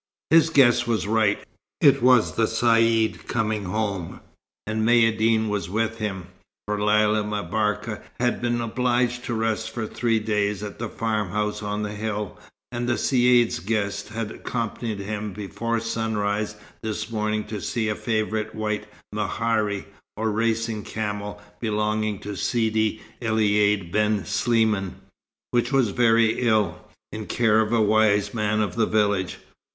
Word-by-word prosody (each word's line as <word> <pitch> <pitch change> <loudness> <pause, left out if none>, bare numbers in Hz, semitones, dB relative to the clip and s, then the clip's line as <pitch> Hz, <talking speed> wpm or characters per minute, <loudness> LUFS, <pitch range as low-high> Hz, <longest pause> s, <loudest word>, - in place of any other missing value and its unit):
His 165 0 +6
guess 120 -6 +4
was 115 -3 0
right. 105 -1 +1 0.3
It - - +5
was 125 -2 +5
the 115 - +2
Caïd 115 -1 +2
coming 110 -3 -1
home, 100 -3 -3 0.5
and 110 +1 -2
Maïeddine 115 -1 +3
was 105 -5 -2
with 115 +2 -1
him; 95 -4 -3 0.4
for 105 0 -2
Lella 105 0 +3
M'Barka 105 +1 -2 0.2
had 120 0 0
been 120 0 0
obliged 120 +1 0
to 120 - -2
rest 110 0 -1
for 115 -1 -4
three 115 +1 0
days 105 -2 -1
at 105 0 -7
the 120 -1 -3
farmhouse 105 -1 -2
on 105 0 -2
the 105 - -3
hill, 105 -1 -4 0.3
and 120 0 -2
the 120 - +2
Caïd's 125 -3 +3
guest 100 0 -2
had 110 -1 -4
accompanied 115 -2 -4
him 105 +1 -4
before 115 +4 -3
sunrise 110 -2 -1 0.3
this 110 0 -4
morning 110 -1 -1
to 105 -1 -6
see 115 -2 -1
a 105 - +1
favourite 110 -1 -2
white 105 -1 -2 0.3
mehari, 105 -1 -1 0.3
or 110 0 0
racing 115 0 0
camel, 105 -1 -4 0.2
belonging 105 -1 0
to 105 +1 -6
Sidi 110 +3 0 0.2
Elaïd 105 -4 +2
ben 105 -1 +1
Sliman, 110 -6 +1 0.6
which 120 +3 +1
was 135 -5 +3
very 115 +1 +3
ill, 105 -6 +2 0.3
in 110 0 -6
care 110 -2 +3
of 110 0 -1
a 120 - +3
wise 105 -1 +3
man 110 -1 0
of 100 -4 -2
the 115 -1 +2
village. 100 -4 +1
110 Hz, 145 wpm, -24 LUFS, 105-115 Hz, 0.6 s, His